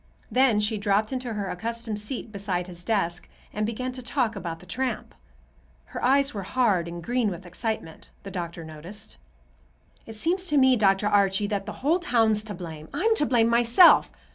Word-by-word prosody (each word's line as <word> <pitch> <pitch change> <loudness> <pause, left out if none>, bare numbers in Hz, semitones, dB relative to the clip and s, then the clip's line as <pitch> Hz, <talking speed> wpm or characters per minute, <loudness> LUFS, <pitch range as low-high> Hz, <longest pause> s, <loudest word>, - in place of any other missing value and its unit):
Then 250 -4 +4
she 210 0 0
dropped 205 +3 +1
into 250 -3 -3
her 200 -2 -3
accustomed 230 +1 -4
seat 225 +1 -5
beside 195 -3 -2
his 175 -1 -11
desk 175 -5 -1 0.2
and 210 0 -1
began 255 +3 -3
to 255 0 -7
talk 240 -2 -1
about 170 -4 -5
the 180 - -15
tramp. 255 +8 -3 0.8
Her - - -5
eyes 275 +2 +3
were 200 - -4
hard 195 -4 +1
and 170 0 -7
green 245 0 0
with 185 0 -7
excitement, 180 -2 -5
the 195 - -8
doctor 170 -2 -5
noticed. 165 +7 -9 0.9
"It 225 - -9
seems 360 - 0
to 300 - +2
me, 260 -1 +5
Dr. 195 -2 +2
Archie, 200 -1 +3
that 200 -1 -3
the - - -3
whole 330 +5 +3
town's 225 - +2
to 210 -3 -5
blame. 160 -3 -9
I'm 445 +4 +2
to 295 - +2
blame, 235 -3 +3
myself. 235 +9 +6
215 Hz, 185 wpm, -26 LUFS, 190-245 Hz, 0.9 s, myself